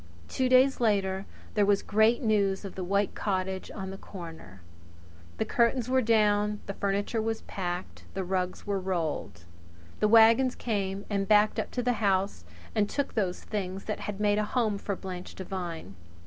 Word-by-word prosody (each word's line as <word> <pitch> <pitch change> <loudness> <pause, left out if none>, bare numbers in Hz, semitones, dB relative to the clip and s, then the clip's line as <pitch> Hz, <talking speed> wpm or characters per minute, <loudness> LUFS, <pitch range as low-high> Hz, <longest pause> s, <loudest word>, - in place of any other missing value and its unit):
Two 255 - 0
days 260 +1 +5
later 195 -4 +1 0.3
there 210 - +3
was 200 0 +3
great 220 +5 +3
news 200 -3 +1
of 195 - -7
the 185 - -5
white 200 +2 +1
cottage 190 -1 -2
on 190 -2 -6
the 195 - -8
corner. 160 - -10 0.8
The 220 - 0
curtains 235 +2 +1
were 260 0 +3
down; 210 -2 +2
the 200 - -4
furniture 200 +3 -1
was 225 0 -2
packed; 180 -1 -5
the 190 - -1
rugs 185 0 -2
were 200 -1 -1
rolled. 160 - -3 0.5
The 210 - +3
wagons 230 +3 +6
came 200 -3 -2
and 200 -2 -1
backed 210 0 +4
up - - -2
to 245 - +1
the 245 0 +2
house 195 - +1 0.3
and 210 -1 +1
took 285 - -2
those 190 -5 -1
things 195 -2 -4
that 215 - -3
had 205 -1 -5
made 210 0 +2
a - - +1
home 215 -2 0
for 200 - -3
Blanche 185 -1 -7
Devine. 175 - -5
200 Hz, 175 wpm, -28 LUFS, 190-220 Hz, 0.8 s, wagons